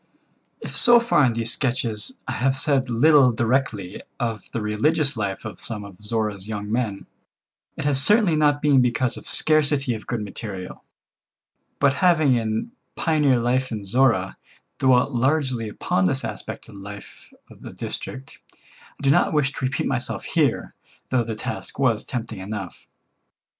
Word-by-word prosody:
If - - -7
so 240 0 +7
far 235 - +3
in 120 - +1
these 115 +1 -1
sketches 120 -5 -2
I - - -2
have 135 +4 0
said 135 -2 0
little 130 +2 +5
directly 110 -5 -1 0.2
of 115 -3 -2
the 115 - -3
religious 140 +8 +1
life 100 -1 -3
of 110 - -7
some 110 -3 -5
of 100 -1 -13
Zorra's 105 -2 -3
young 105 -1 -5
men, 110 -4 -2 0.7
it - - -4
has 140 -2 +4
certainly 205 +1 +5
not 145 -1 +2
been 140 -3 +5
because 125 0 0
of - - -11
scarcity 145 -4 +2
of 110 - -8
good 120 -3 -2
material. 100 -2 -7 0.9
But 140 -1 +3
having 160 -7 +4
in 110 - -1 0.2
"Pioneer 150 -6 +2
Life 125 +2 0
in 105 -3 -5
Zorra 110 -3 +2 0.2
" - - -42
dwelt 130 +1 +3
largely 130 -3 0
upon 95 -2 0
this 135 +9 0
aspect - - -7
of - - -13
the 100 - -11
life 100 0 -11 0.2
of - - -16
the - - -9
district, 65 - -7 0.6
I - - -11
did 135 - +4
not - - +3
wish 145 -2 +2
to - - -7
repeat 135 +2 -1
myself 130 -2 -3
here, - - 0 0.4
though 125 -2 +2
the 115 -1 -5
task 130 +4 -6
was 125 -5 +1
tempting 115 -4 -5
enough. 95 -1 -7
120 Hz, 165 wpm, -23 LUFS, 110-140 Hz, 0.9 s, so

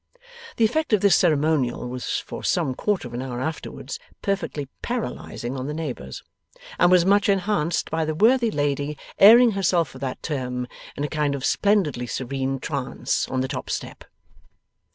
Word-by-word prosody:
The 230 - +4
effect 310 +3 0
of 210 - +4
this 200 -2 +5
ceremonial 150 -7 +2
was 125 0 -3
for - - -7
some 130 - +1
quarter 195 -1 -1
of 120 - -12
an 120 - -3
hour 125 -2 -5
afterwards 160 - -5 0.2
perfectly 195 -8 -2
paralyzing 225 - -4
on 130 0 -4
the 150 - -4
neighbours, 155 -5 -5 0.6
and - - +6
was 180 -1 +5
much 200 +1 +4
enhanced 195 -4 0
by 160 0 0
the 155 0 -2
worthy 235 +6 +4
lady 145 -3 -1 0.2
airing 230 +4 +8
herself 180 -6 +1
for 130 - -12
that 130 -1 -5
term 125 -4 -3 0.3
in 145 - -3
a - - 0
kind 150 -2 0
of 135 - -4
splendidly 175 - +1
serene 135 +3 -2
trance 135 -2 -2
on 130 -1 -1
the 130 - -1
top 130 -1 -5
step. - - -5
150 Hz, 170 wpm, -24 LUFS, 130-195 Hz, 0.6 s, airing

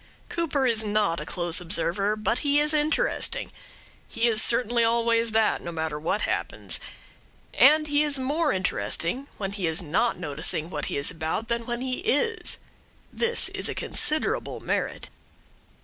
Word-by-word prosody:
Cooper 300 -5 -1
is 225 -3 +2
not 205 -5 0
a 150 - -7
close 175 0 +1
observer, 180 +4 0
but 215 +2 -1
he 290 0 +2
is 300 +1 +2
interesting. 310 +11 +2 0.6
He 230 +1 0
is 220 -2 +3
certainly 235 0 +2
always 230 0 +2
that, 220 0 +2
no 170 - -6
matter 160 -2 -3
what 170 +7 -1
happens. - - -2 0.7
And 305 +1 +6
he 290 0 +1
is 295 -2 +1
more 290 +6 0
interesting 190 +5 -1
when 195 -2 -4
he 200 -4 -2
is 160 +3 -1
not 185 +9 0
noticing 160 0 -2
what 150 -3 -2
he - - -3
is 140 - +2
about 165 +7 -4
than 235 0 -2
when 240 0 -3
he 255 -1 -3
is. 445 +3 +1 0.6
This 470 0 +2
is - - 0
a - - -4
considerable 370 +10 0
merit. - - -3
230 Hz, 160 wpm, -25 LUFS, 175-285 Hz, 0.7 s, And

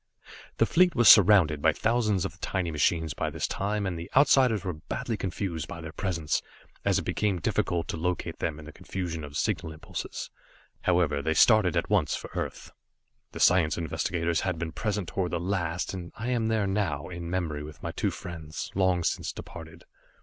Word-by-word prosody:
The - - +4
fleet 180 +1 +3
was 120 -2 +4
surrounded 90 -8 +7
by - - +4
thousands 110 -5 +1
of - - -3
the 80 - -21
tiny 90 -2 -2
machines 80 0 +1
by - - -2
this - - -3
time, 100 +1 -2
and 90 -3 -3
the 85 +3 -7
Outsiders 130 -7 +5
were 90 - -1
badly 90 +8 -4
confused 95 -4 -3
by 85 - -7
their 80 -1 -7
presence, 85 -5 -1 0.4
as - - +2
it - - -1
became 105 -3 0
difficult 85 0 -1
to - - -2
locate 90 +2 -2
them 75 - -2
in 80 - -10
the 75 - -9
confusion 85 -1 -5
of 70 0 -6
signal 80 - -1
impulses. 80 0 -6 0.5
However, 85 -6 +2
they 80 +3 0
started 100 -1 +5
at 85 - -1
once 90 -9 +2
for - - -8
Earth. - - -5 0.6
The - - -6
science 90 -4 +4
investigators 85 0 -1
had 90 -3 -1
been 85 -1 -4
present 105 +1 -2
toward 90 +2 -1
the 85 - 0
last, 90 -1 -2
and 90 -2 -6
I 115 +3 -4
am 120 -3 +1
there 110 -2 +1
now, 95 -8 -1
in 85 -1 -6
memory 85 -5 -2
with 75 +1 -10
my - - -3
two - - -1
friends, 80 -3 -7
long 95 -2 +2
since - - -1
departed. 80 0 -10
90 Hz, 195 wpm, -28 LUFS, 80-100 Hz, 0.6 s, surrounded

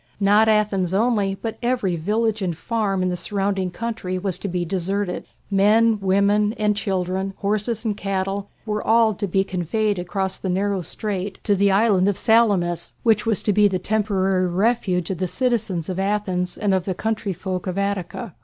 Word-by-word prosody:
Not 205 +2 +4
Athens 200 -4 +1
only, 205 -3 +1
but 225 +2 -6
every 240 -7 0
village 215 +5 0
and 175 -4 -2
farm 205 -3 -1
in 185 - +1
the 180 - -1
surrounding 195 0 -1
country 185 -2 -4
was 185 -1 -1
to - - -4
be 180 -1 -2
deserted. 190 +1 -2 0.2
Men, 215 +3 +4
women, 200 +2 +2
and 210 -2 0
children, 190 0 -2
horses 215 +3 -1
and 215 -2 0
cattle, 195 0 -3 0.2
were 210 -1 -2
all 225 -1 +4
to 200 +1 -3
be 195 +1 +2
conveyed 195 +2 -1
across 190 +1 -2
the 190 - -4
narrow 195 +1 0
strait 195 +2 -4
to 205 - +2
the 200 +1 +3
island 195 -1 +3
of 205 - +1
Salamis, 200 -7 +2
which 220 -2 +2
was 220 -4 +1
to 210 - +2
be 205 +1 +5
the 190 -2 0
temporary 195 -2 +1
refuge 185 -2 0
of 185 - -4
the 185 - 0
citizens 220 -7 -1
of 185 0 -3
Athens 190 -3 -1
and 205 -2 +1
of 185 -2 0
the 190 - -2
country 220 -1 -2
folk 185 +1 -4
of 185 +1 -3
Attica. 200 +1 -3
200 Hz, 180 wpm, -22 LUFS, 185-215 Hz, 0.2 s, be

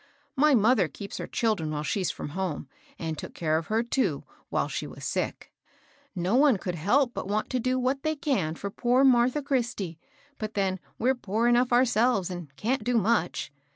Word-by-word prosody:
My 290 +1 +5
mother 220 -4 +4
keeps 200 +8 -8
her - - -4
children 215 -9 0
while 150 -1 -3
she's 185 +3 0
from 145 - -5
h(»ne, 180 -4 -3 0.3
and 160 -1 -3
took - - -8
care 160 -1 +1
of 160 - -9
her, 220 +2 +1
too, 255 +2 0 0.3
while - - 0
she - - -4
was - - -9
sick. - - -3 0.6
No 180 +3 -1
one 270 -4 +5
could 180 -1 -4
help 240 - +2
but - - -5
ws^it 210 +2 -1
to 255 - 0
do 255 +2 0
what 260 +2 0
they 310 +1 0
can 215 - -1
for 200 +4 -5
poor 245 +5 +2
Martha 255 +2 +4
Christie 240 - -2
I - - -38 0.3
but 215 0 -5
then 190 -2 0 0.2
we're 255 +3 +2
poor 230 -1 -1
enough 240 +1 +3
ourselves, 240 -5 +3
and 175 -3 -6
can't 235 - -1
do 245 +1 +1
much. 210 -8 0
225 Hz, 195 wpm, -27 LUFS, 185-255 Hz, 0.6 s, My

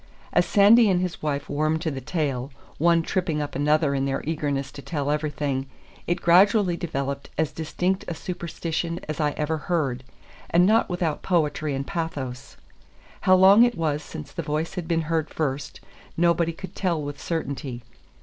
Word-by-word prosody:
As - - +3
Sandy 210 +2 +6
and 180 -2 +3
his 180 -1 -3
wife 140 -2 -2
warmed 155 +2 0
to 160 - -1
the 135 -1 -5
tale, 135 -3 -2 0.3
one 170 +1 +4
tripping 170 -3 -1
up 145 -1 -3
another 150 +1 +2
in 135 -1 0
their 135 0 -2
eagerness 145 -4 -2
to 140 - -9
tell 145 -2 -2
everything, 145 -3 -2 0.4
it 175 +1 -1
gradually 185 +1 +5
developed 140 -5 -4
as 155 -1 +1
distinct 180 +4 -2
a 175 - -3
superstition 170 0 -4
as 155 -1 -4
I 150 -2 +1
ever 160 +1 -1
heard, 135 -8 0 0.5
and 175 +1 +5
not 220 +4 +3
without 175 -4 -1
poetry 155 -4 0
and 135 +1 -3
pathos. 140 -7 -5 0.6
How 185 - +5
long 190 +4 +7
it 240 -3 +2
was 155 -3 0
since 155 -2 -9
the 170 - -4
voice 155 +1 -2
had 180 -4 -5
been 165 -1 +1
heard 160 -1 -1
first, 145 -2 -3 0.4
nobody 170 0 +3
could 185 +3 -9
tell 175 -4 0
with 145 -1 -6
certainty. 140 -6 -4
160 Hz, 170 wpm, -25 LUFS, 145-175 Hz, 0.6 s, long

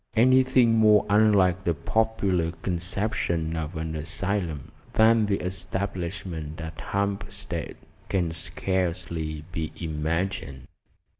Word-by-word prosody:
Anything 125 -1 +5
more 105 -2 +6
unlike 100 -3 +4
the 85 -4 +1
popular 100 -6 0
conception 85 -2 -1
of 80 +1 -4
an 80 0 -3
asylum 85 -1 -2 0.2
than 110 -1 +5
the 100 -1 +1
establishment 90 -4 -4
at 80 -1 -7
Hampstead 100 0 -3 0.3
can 90 -4 0
scarcely 85 -2 -2
be 80 -2 -3
imagined. 80 -3 -3
90 Hz, 95 wpm, -26 LUFS, 80-100 Hz, 0.3 s, more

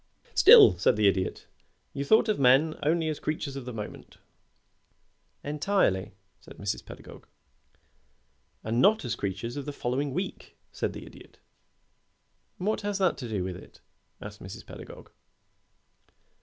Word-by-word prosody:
"Still," 90 - +8
said 100 - +3
the 105 -1 +3
Idiot, 95 -1 -1 0.5
"you 140 - -3
thought 220 +9 +4
of 215 - 0
men 135 +5 +4
only 160 +2 +1
as 155 -1 -3
creatures 155 -2 -4
of 135 -3 -7
the 125 - -6
moment 105 -2 -9 0.6
" - - -44
"Entirely," 145 - 0 0.2
said - - -15
Mrs. 100 0 -4
Pedagog. - - -13 1.4
"And 115 +3 0
not 215 +2 +4
as 120 - -2
creatures 100 +6 -4
of 140 - -5
the - - -5
week 140 - -16
following," 140 +8 -2 0.3
said - - -3
the - - -9
Idiot. - - -15 1.2
"What 210 +4 -1
has 205 -1 -2
that 190 -3 +2
to 125 -4 -6
do 100 -4 -2
with 90 -1 -4
it?" 90 - -14 0.4
asked - - -10
Mrs. - - -9
Pedagog. - - -12
135 Hz, 145 wpm, -27 LUFS, 105-160 Hz, 1.4 s, Still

